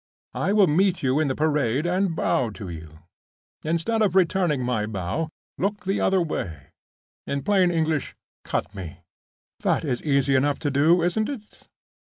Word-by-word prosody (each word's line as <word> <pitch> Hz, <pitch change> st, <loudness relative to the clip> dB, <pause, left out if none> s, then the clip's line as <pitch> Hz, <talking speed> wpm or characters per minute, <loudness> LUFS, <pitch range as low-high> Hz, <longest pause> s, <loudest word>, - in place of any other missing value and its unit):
I -, -, 0 dB
will 205 Hz, -1 st, +5 dB
meet 180 Hz, +3 st, +2 dB
you 135 Hz, +3 st, +2 dB
on 155 Hz, -, +1 dB
the 130 Hz, -, -1 dB
Parade, 150 Hz, -3 st, +1 dB
and 180 Hz, 0 st, +1 dB
bow 125 Hz, -6 st, +1 dB
to 100 Hz, -5 st, -7 dB
you. 80 Hz, -1 st, -10 dB, 0.6 s
Instead 170 Hz, +8 st, 0 dB
of 195 Hz, -4 st, +2 dB
returning 175 Hz, -6 st, +2 dB
my 115 Hz, -4 st, -1 dB
bow, 105 Hz, -, -3 dB, 0.3 s
look 200 Hz, +2 st, -1 dB
the 195 Hz, +1 st, 0 dB
other 190 Hz, 0 st, +3 dB
way. 80 Hz, -, -5 dB, 0.6 s
In 140 Hz, -1 st, -2 dB
plain 190 Hz, -3 st, +3 dB
English, 160 Hz, -4 st, -1 dB, 0.3 s
cut -, -, -3 dB
me! 95 Hz, -6 st, -8 dB, 0.6 s
That -, -, 0 dB
is 125 Hz, -4 st, -1 dB
easy 140 Hz, -2 st, +2 dB
enough 140 Hz, +2 st, +2 dB
to 145 Hz, -, +2 dB
do, 160 Hz, +5 st, +4 dB
isn't 215 Hz, +5 st, 0 dB
it?" 220 Hz, -7 st, -9 dB
155 Hz, 160 wpm, -24 LUFS, 130-185 Hz, 0.6 s, will